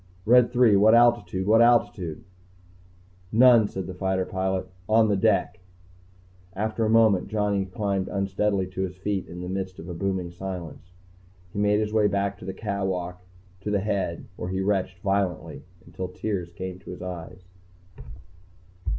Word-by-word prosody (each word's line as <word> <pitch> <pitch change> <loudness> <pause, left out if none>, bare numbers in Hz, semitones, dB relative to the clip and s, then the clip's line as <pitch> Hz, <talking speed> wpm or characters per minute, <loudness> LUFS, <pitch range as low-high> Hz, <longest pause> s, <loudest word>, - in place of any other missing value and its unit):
"Red 120 +1 +5
Three, 120 -4 +5
what 110 +3 +6
altitude? 120 -5 +3
What 110 +3 +5
altitude?" 105 -9 +2 1.1
"None," 115 -1 +6
said 95 -2 -5
the 95 - -6
fighter 95 0 -1
pilot. 95 0 -2 0.2
"On 110 0 +4
the 100 - +2
deck." 95 - +1 0.9
After 110 +3 -2
a 110 - +1
moment, 110 -4 +4
Johnny 105 -2 0
climbed 95 0 -2
unsteadily 100 0 0
to 95 0 -5
his 95 -1 -3
feet 95 0 -2
in 90 +1 -8
the 90 - -5
midst 95 0 -4
of 85 - -9
a 90 - -5
booming 90 0 -2
silence. 90 -1 -8 0.6
He 100 - -3
made 105 0 +3
his 105 0 -3
way 110 -2 +4
back 100 -2 -2
along 95 - -9
the 95 - -3
catwalk 95 -4 -3 0.4
to 100 - -5
the 105 -1 +1
head, 95 -5 -2
where 90 - -5
he 95 +1 -2
retched 95 -1 0
violently 95 -3 -2 0.2
until 95 - -6
the 90 - -16
tears 95 -5 -3
came 90 +1 -7
to - - -13
his 90 0 -7
eyes. 90 0 -8
95 Hz, 165 wpm, -25 LUFS, 95-105 Hz, 1.1 s, what